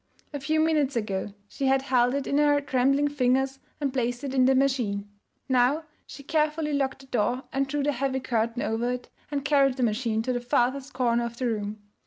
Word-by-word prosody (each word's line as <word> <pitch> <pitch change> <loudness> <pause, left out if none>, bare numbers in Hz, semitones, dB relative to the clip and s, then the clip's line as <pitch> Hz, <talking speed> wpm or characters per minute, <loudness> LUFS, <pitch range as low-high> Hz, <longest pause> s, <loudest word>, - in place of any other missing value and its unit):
A 285 - -3
few 310 +3 0
minutes 305 -4 +2
ago 205 -2 -2
she 275 +5 -2
had 265 0 +3
held 250 -1 +2
it 280 - -2
in 280 - +1
her 290 -1 +4
trembling 275 +1 +2
fingers 265 -1 +1 0.2
and 280 -3 -1
placed 245 0 -1
it 275 -2 -3
in 260 -1 +4
the 265 +1 +4
machine. 245 -7 0 0.4
Now 260 +5 +3 0.2
she 280 - -10
carefully 305 +1 0
locked 270 -1 -1
the - - -14
door 245 +1 0
and 275 0 0
drew 290 +1 -1
the 290 - +2
heavy 265 0 -1
curtain 235 -1 -1
over 230 +2 -1
it 250 - -7 0.2
and 285 -1 -3
carried 275 -2 +3
the 255 - 0
machine 225 -1 0
to 255 - -1
the 245 - -2
farthest 260 +3 0
corner 240 -2 +1
of 235 0 -7
the 255 - -2
room. 210 -2 -3
265 Hz, 210 wpm, -26 LUFS, 240-280 Hz, 0.4 s, her